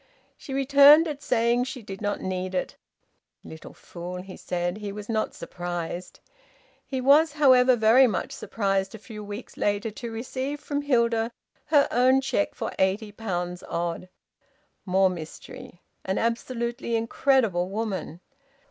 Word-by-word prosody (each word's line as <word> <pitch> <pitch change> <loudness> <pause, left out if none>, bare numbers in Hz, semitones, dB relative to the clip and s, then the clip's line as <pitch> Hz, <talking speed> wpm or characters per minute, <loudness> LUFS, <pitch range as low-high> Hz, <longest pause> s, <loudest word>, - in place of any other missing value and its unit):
She 275 - -11
returned 280 +3 +7
it, 295 -3 -5
saying 240 0 +1
she 255 -2 -7
did 195 -1 -8
not 205 -1 -2
need 185 0 -3
it. 180 - -2 0.7
"Little 160 0 -11
fool!" 180 +1 -8
he 190 -1 -10
said. 175 +1 -3
He 210 -1 -5
was 205 +1 -8
not 220 -1 -1
surprised. 175 0 -6 0.6
He 265 - -4
was, 285 +4 +5
however, 260 -4 +5
very 235 +4 +6
much 205 -6 -2
surprised, 195 -2 -2
a - - -7
few 210 0 -10
weeks 205 +3 -8
later, 205 +2 0
to 230 +2 -7
receive 260 +5 -4
from 290 -1 -3
Hilda 235 -4 +1 0.4
her 290 -2 +4
own 255 +2 +4
cheque 265 -6 -1
for - - -4
eighty 200 +3 +1
pounds 180 -5 -4
odd! 170 +1 -3 0.8
More 190 0 +3
mystery! 170 +1 -10 0.2
An 190 - -2
absolutely 235 +1 -2
incredible 225 -5 +1
woman! 195 -5 -4
225 Hz, 140 wpm, -26 LUFS, 190-255 Hz, 0.8 s, returned